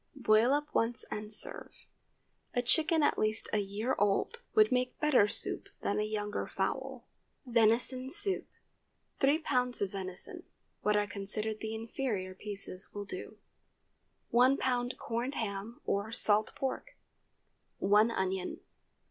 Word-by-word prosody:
Boil 230 -2 +4
up 295 +1 0
once 230 +1 0
and 210 0 -5
serve. 215 - -2 0.7
A 245 - +1
chicken 320 +4 +3
at - - +2
least 215 +1 0
a 215 - +3
year 205 +5 -2
old 205 - +1
would 430 -7 +6
make 250 0 0
better 285 -9 +4
soup - - -3
than - - 0
a - - +1
younger 210 -1 -3
fowl. - - -3 0.4
VENISON 245 +2 +2
SOUP. 385 +7 +3
✠ - - -27 0.7
3 290 +4 +3
lbs. 250 -3 +1
of 200 -2 -1
venison. 185 -2 -5 0.4
What 210 0 +2
are 205 - +2
considered 210 +1 -4
the 220 0 -4
inferior 220 -4 -3
pieces 195 -1 -3
will 205 0 -4
do. - - -7 0.9
1 255 +3 +5
lb. 245 -1 -1
corned 240 +4 -3
ham 210 +1 -4
or 200 +2 -1
salt 215 -2 +4
pork. - - -4 0.8
1 210 +3 +4
onion. 190 -4 -2
220 Hz, 140 wpm, -32 LUFS, 205-255 Hz, 0.9 s, would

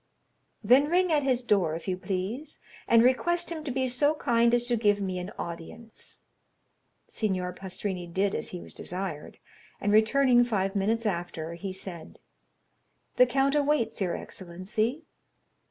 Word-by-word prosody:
"Then 255 +7 +5
ring 360 +1 +2
at 300 -2 +3
his 255 -3 +1
door, 190 -9 +2
if 165 - -8
you 185 - 0
please, 195 +11 -4 0.3
and 230 0 +6
request 345 +8 +2
him 320 -2 -5
to - - -3
be 260 0 0
so 290 +5 +2
kind 235 -4 +2
as 240 0 +2
to 240 0 +1
give 205 -2 +2
me 185 -2 -2
an 180 +2 -5
audience." 195 +7 -8 0.9
Signor 185 -4 -2
Pastrini 185 -1 -5
did 190 +3 0
as - - -3
he 180 - -6
was - - -10
desired, 180 -4 -6 0.4
and 205 - 0
returning 245 +3 +5
five 200 -4 -1
minutes 220 +4 0
after, 170 -4 -3
he 190 +3 -5
said: 185 -3 -8 1.0
"The 250 - +7
count 270 +2 +2
awaits 295 -7 +1
your 180 -3 0
excellency." 210 - -4
215 Hz, 155 wpm, -28 LUFS, 185-255 Hz, 1.0 s, The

